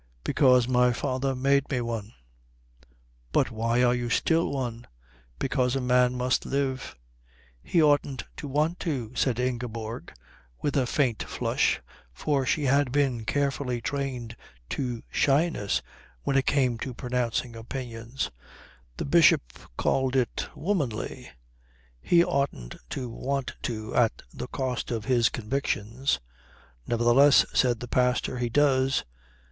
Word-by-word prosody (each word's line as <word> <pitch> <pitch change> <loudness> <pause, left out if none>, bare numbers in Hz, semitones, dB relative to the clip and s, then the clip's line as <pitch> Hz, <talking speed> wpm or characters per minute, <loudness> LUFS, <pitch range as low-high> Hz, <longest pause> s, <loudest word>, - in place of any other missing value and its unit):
"Because 125 -3 +4
my 125 -1 +3
father 135 +1 -1
made 140 +2 +2
me 130 - 0
one." 115 -2 -4 1.2
"But - - +2
why 115 +2 +1
are 120 0 +4
you 120 -1 -2
still 165 +7 +2
one?" 120 -4 -4 0.5
"Because 130 -1 0
a - - +1
man 125 0 +3
must 125 0 +1
live." 135 -2 -2 0.7
"He 165 - +2
oughtn't 145 -3 +2
to 145 - -6
want 150 +5 0
to," 130 -8 -3
said 125 -2 0
Ingeborg 120 -2 -3 0.5
with 145 - -1
a 130 -3 +2
faint 125 -5 +1
flush, - - 0 0.3
for 140 - 0
she 150 - +1
had 140 -1 +3
been 130 -5 +1
carefully 140 -2 -1
trained 125 -3 -4 0.3
to 125 -4 -3
shyness 140 -7 +1 0.4
when 135 - 0
it 135 - +2
came 125 -5 +2
to 130 0 -5
pronouncing 125 -1 -2
opinions 120 +1 -5 0.7
the - - -3
Bishop - - +4 0.2
called 130 0 +1
it 125 -3 +1 0.2
being - - -11
womanly 145 - -2 0.7
"he 170 - +4
oughtn't 140 - -2
to 130 -2 -4
want 135 +3 -3
to 110 -1 -4
at 115 -2 +2
the - - -6
cost 130 -2 -3
of 115 -3 -3
his 120 -2 +3
convictions." 120 - -1 0.7
"Nevertheless," 120 +5 +5
said 120 -3 +2
the 125 - -5
pastor, 125 0 +1
"he 120 -1 0
does." 135 0 +2
125 Hz, 130 wpm, -27 LUFS, 120-140 Hz, 1.2 s, Nevertheless